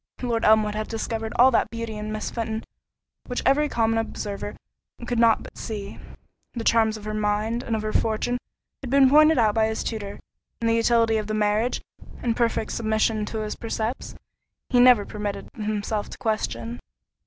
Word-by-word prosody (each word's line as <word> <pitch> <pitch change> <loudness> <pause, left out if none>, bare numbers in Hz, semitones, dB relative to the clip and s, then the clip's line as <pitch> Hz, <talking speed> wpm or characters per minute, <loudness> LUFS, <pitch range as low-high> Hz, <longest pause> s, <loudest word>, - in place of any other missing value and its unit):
Lord 235 -2 0
Elmwood 215 -1 +4
had 215 0 -3
discovered 225 0 -3
all 255 +2 +6
that 230 - +2
beauty 230 -1 -5
in 210 0 -5
Miss 215 0 -4
Fenton 225 -1 -3 0.6
which 245 - -3
every 295 +2 +3
common 225 -2 +1
observer 205 -2 -4 0.5
could 240 -1 -1
not 230 -1 +4
but - - -12
see. 205 -3 -6 0.5
The 235 - -4
charms 220 -1 +3
of 210 - -11
her 215 - -3
mind 215 +2 0
and 230 - -2
of 215 - -3
her 215 - -3
fortune 225 +3 0 0.4
had 265 - -6
been 270 0 +5
pointed 305 +2 +6
out 220 -3 +3
by 220 0 +2
his 220 0 -2
tutor; 205 -3 -5 0.4
and 230 - -1
the 230 - +3
utility 230 -1 +3
of 215 -1 -3
the 215 - -2
marriage, 215 +3 +1 0.4
in 235 -2 +1
perfect 230 -2 0
submission 220 -1 0
to 220 0 -3
his 210 0 -4
precepts, 225 +2 -4 0.5
he 250 - +3
never 245 -4 +6
permitted 210 -1 -5
himself 215 -1 -2
to - - -9
question. 120 - -2
220 Hz, 180 wpm, -24 LUFS, 215-235 Hz, 0.6 s, all